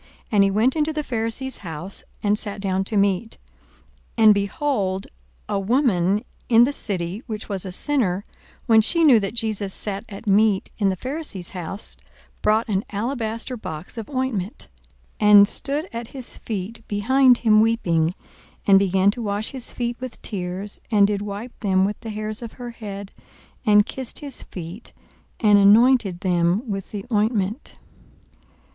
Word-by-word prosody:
And 205 -3 +5
he 195 - +3
went 220 +6 +2
into 310 0 +1
the 305 -1 -3
Pharisee's 235 +2 -2
house, 170 +1 -5 0.2
and 210 0 +2
sat 205 -1 -5
down 190 -1 0
to 210 - -2
meat. 200 +3 +1 0.8
42:007:037 225 - +3
And, 215 - +9
behold, 200 -2 -1 0.4
a 205 -1 -1
woman 205 -3 +2 0.3
in 230 0 +7
the 275 +4 +1
city, 190 -4 -2
which 215 -2 -5
was 195 -2 -3
a - - -5
sinner, 205 -4 0 0.4
when 220 -1 +6
she 335 +9 +3
knew 265 -8 +7
that 200 +2 -4
Jesus 215 -4 0
sat 200 -1 -3
at 200 +2 -9
meat 205 -1 +3
in 200 -2 +3
the 190 - 0
Pharisee's 260 - -5
house, 185 +2 -5 0.4
brought 215 +3 +2
an 200 -2 0
alabaster 230 +2 -3
box 160 -5 -7
of 225 -3 -7
ointment, 255 - -3 0.5
42:007:038 210 - +3
And 205 -1 +9
stood 285 - -2
at 230 0 -5
his 260 -1 -5
feet 215 +2 -5
behind 250 +5 +4
him 215 -3 +4
weeping, 180 -7 +1 0.5
and 195 -1 +7
began 195 0 +3
to 240 - -7
wash 205 0 -2
his 260 -3 -4
feet 240 -1 -3
with 255 -2 -7
tears, 190 0 -5
and 210 -3 +5
did 200 0 -1
wipe 210 +4 -7
them 190 -3 +2
with 205 +1 -3
the 225 - -7
hairs 215 +1 -3
of 230 -2 -7
her 245 -1 -7
head, 200 -4 -8 0.6
and 210 -1 +6
kissed 260 0 -5
his 280 -4 -4
feet, 180 +5 -9 0.5
and 210 -2 +5
anointed 205 -2 +5
them 180 +5 +1
with 195 -2 -4
the 200 -2 -6
ointment. 215 +2 0
210 Hz, 165 wpm, -23 LUFS, 195-235 Hz, 0.8 s, And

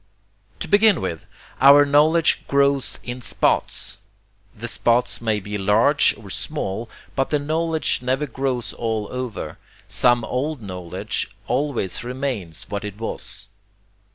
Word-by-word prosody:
To - - -3
begin 205 -3 +5
with, 85 -4 -4 0.3
our 140 +2 +8
knowledge 155 +3 +4
grows 140 -1 +2
IN 125 +1 -6
SPOTS. - - -1 0.6
The 115 +3 -5
spots 120 +1 +1
may 110 -2 +1
be 105 +1 -5
large 110 +9 +4
or 100 -2 -11
small, 115 -6 -3 0.3
but 135 - +1
the 150 - +2
knowledge 160 +1 0
never 130 +4 0
grows 125 -5 -2
all 110 -3 -2
over: 125 -3 -5 0.3
some 120 +5 +3
old 140 +6 -2
knowledge 90 -4 -4 0.2
always 125 -6 -1
remains 125 - -3
what 100 0 -4
it 105 -1 -6
was. 115 - -6
125 Hz, 125 wpm, -22 LUFS, 105-145 Hz, 0.6 s, our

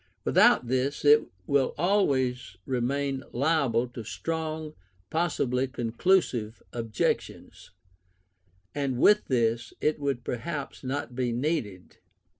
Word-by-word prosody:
Without - - +5
this 130 +4 -1
it 150 +1 +6 0.2
will 140 +3 +1
always 130 - +1
remain 135 +2 -1
liable 135 -4 +1
to 120 -1 -8
strong, 160 +3 -4 0.4
possibly 135 -6 0
conclusive, 120 - 0
objections; 115 -2 -3 1.0
and 140 -3 -1
with 210 +10 +5
this, 115 -2 0
it 155 0 0
would 140 -4 -2
perhaps 140 +4 -5
not 130 -1 -3
be 125 -1 0
needed. 120 - -3
130 Hz, 100 wpm, -27 LUFS, 120-150 Hz, 1.0 s, it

